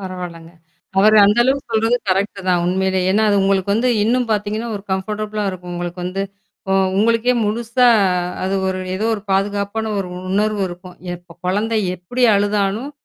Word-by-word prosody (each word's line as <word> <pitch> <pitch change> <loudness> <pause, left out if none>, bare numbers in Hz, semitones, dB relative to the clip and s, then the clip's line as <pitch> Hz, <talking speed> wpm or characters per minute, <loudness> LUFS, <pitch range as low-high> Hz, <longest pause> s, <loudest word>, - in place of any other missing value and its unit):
பரவால்லங்க. 180 -3 -7 0.5
அவரு 215 +2 +6
அந்த 210 +3 +3
அளவுக்கு 265 -1 0
சொல்றது 225 +2 +2
கரெக்ட்டு 195 +2 0
தான் 175 -1 +2
உண்மையிலே. 190 +1 +1
ஏன்னா 210 +3 +2
அது 205 - +3
உங்களுக்கு 195 0 +1
வந்து 235 +4 +1 0.2
இன்னும் 245 +1 +1
பார்த்தீங்கன்னா 215 +2 -2
ஒரு 200 - -9
கம்ஃபர்டபிளா 210 +2 -3
இருக்கும் 180 -1 -8
உங்களுக்கு 175 +1 -5
வந்து. 185 +2 -2 0.5
ஒ - - +3 0.3
உங்களுக்கே 230 +3 +3
முழுசா 235 +4 +1 0.6
அது 190 +1 -1
ஒரு 185 0 -2 0.2
ஏதோ 200 +3 -2
ஒரு 205 - -7
பாதுகாப்பான 200 +3 -1
ஒரு 190 - -3 0.2
உணர்வு 210 +1 +1
இருக்கும். 180 +1 -11 0.2
எப்ப 175 -1 -15
குழந்தை 215 +4 0 0.2
எப்பிடி 185 +8 -1
அழுதாலும், 205 +5 0
200 Hz, 155 wpm, -19 LUFS, 185-220 Hz, 0.6 s, அவரு